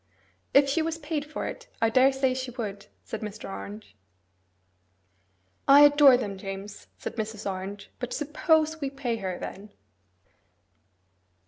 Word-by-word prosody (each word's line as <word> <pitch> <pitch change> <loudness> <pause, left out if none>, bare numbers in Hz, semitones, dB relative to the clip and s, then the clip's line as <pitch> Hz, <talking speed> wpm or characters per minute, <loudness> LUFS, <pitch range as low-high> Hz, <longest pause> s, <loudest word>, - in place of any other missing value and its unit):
'If 275 0 +6
she 280 +4 +1
was 325 0 -2
paid 300 -1 -3
for 300 - -5
it, - - -7
I 225 0 +2
daresay 265 +1 +4
she 260 0 -4
would,' 210 -5 -6 0.2
said 220 - -6
Mr. 210 0 -6
Orange. 100 +1 -8 1.7
'I 280 +1 +9
adore 290 -3 +8
them, 200 -6 -4
James,' 195 +1 -7
said - - -7
Mrs. 215 -1 -4
Orange, 195 +1 -5
'but 250 0 -4
SUPPOSE 315 +1 +1
we 275 - -1
pay 270 -4 -3
her, 190 -4 -4
then! 200 +3 -8
245 Hz, 135 wpm, -27 LUFS, 200-285 Hz, 1.7 s, I